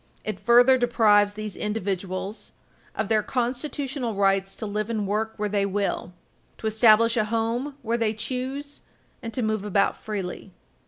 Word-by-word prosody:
It 215 -3 -4
further 245 +2 +6
deprives 210 -4 +4
these 215 -1 -6
individuals 195 -1 -4 0.4
of 220 - -1
their 215 0 +3
constitutional 255 0 -2
rights 195 -1 +1
to - - -6
live 210 +1 -3
and 215 -3 -1
work 215 +3 -1
where 210 -1 -1
they 200 -1 0
will, 200 -3 -2 0.5
to - - -9
establish 220 +1 +5
a 215 - +2
home 230 +5 -1
where 235 +1 0
they 220 -1 0
choose 260 +6 -5 0.4
and 230 - -5
to 250 - -1
move 215 -2 0
about 200 -1 +2
freely. 195 -2 -6
220 Hz, 155 wpm, -25 LUFS, 205-235 Hz, 0.5 s, further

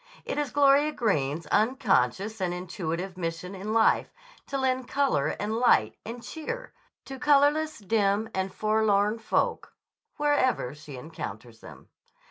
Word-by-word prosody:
It - - -2
is 290 -2 -1
Gloria 285 +2 +4
Greene's 160 - 0
unconscious 210 - +1
and 175 -1 -1
intuitive 180 0 -4
mission 165 +1 -4
in 195 +2 -5
life 225 0 +3 0.4
to 275 - -2
lend 260 -1 0
color 280 -1 +1
and 215 +2 -2
light 110 - +3
and 235 +1 -7
cheer 475 +11 -6 0.3
to 270 -1 -8
colorless, 295 +2 +3
dim, 205 0 +1
and 190 0 -2
forlorn 215 0 +1
folk 225 - -1 0.4
wherever 290 - +1
she 150 -2 -10
encounters 120 -6 -8
them. - - -14
215 Hz, 130 wpm, -27 LUFS, 175-265 Hz, 0.4 s, Gloria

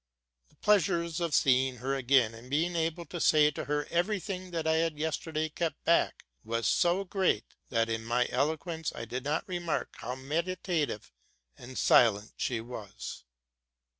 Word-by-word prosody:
The - - -28
pleasure 190 -4 +3
of 170 -1 -1
seeing 130 -1 +3
her 130 +3 -2
again, 130 -3 +3
and 115 +3 -12
being 165 +5 0
able 165 +1 -1
to 175 +3 -6
say 150 -1 +5
to - - -5
her 145 0 -1
every 180 +5 +1
thing 185 0 -5
that 165 -2 -3
I 160 0 +3
had 165 -2 0
yes 160 +1 0
terday 155 -1 -3
kept 165 -2 -3
back, 170 - +2 0.2
was 115 +1 -2
so 175 +3 +3
great, 185 - 0 0.2
that, 115 -2 +1
in 115 0 -2
my 120 +2 +1
eloquence, 160 +4 -1
I 115 - -5
did 125 +3 -4
not 150 +9 -1
remark 175 -3 -2
how 125 +2 -5
meditative 160 - -2 0.4
and 125 +1 -10
Silene 110 -3 +4
she 120 -3 -1
was. 105 - -8
150 Hz, 165 wpm, -30 LUFS, 125-170 Hz, 0.4 s, say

